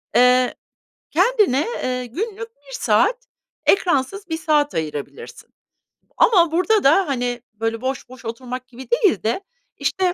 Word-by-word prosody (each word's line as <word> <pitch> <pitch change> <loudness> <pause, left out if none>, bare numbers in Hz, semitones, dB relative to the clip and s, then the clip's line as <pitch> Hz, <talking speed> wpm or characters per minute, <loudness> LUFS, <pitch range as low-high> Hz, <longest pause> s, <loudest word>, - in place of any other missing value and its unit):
Eee, 250 +1 +4 0.6
kendine, 375 - +3 0.2
eee, 250 0 -2
günlük 440 - -5
1 280 -1 -18
saat, 405 - +1 0.4
ekransız 375 +1 +1
1 320 - -1
saat 300 -2 +1
ayırabilirsin. 155 - -6 0.7
Ama 345 -7 +5
burada 370 +6 +2
da, 325 +7 +4
hani, 245 -3 -2
böyle, 225 +2 -3
boş 260 -1 -3
boş 255 -1 -13
oturmak 250 +2 -6
gibi 255 +1 -12
değil 455 -6 +2
de 230 - 0 0.4
işte 370 -2 0
275 Hz, 130 wpm, -21 LUFS, 250-390 Hz, 0.7 s, Ama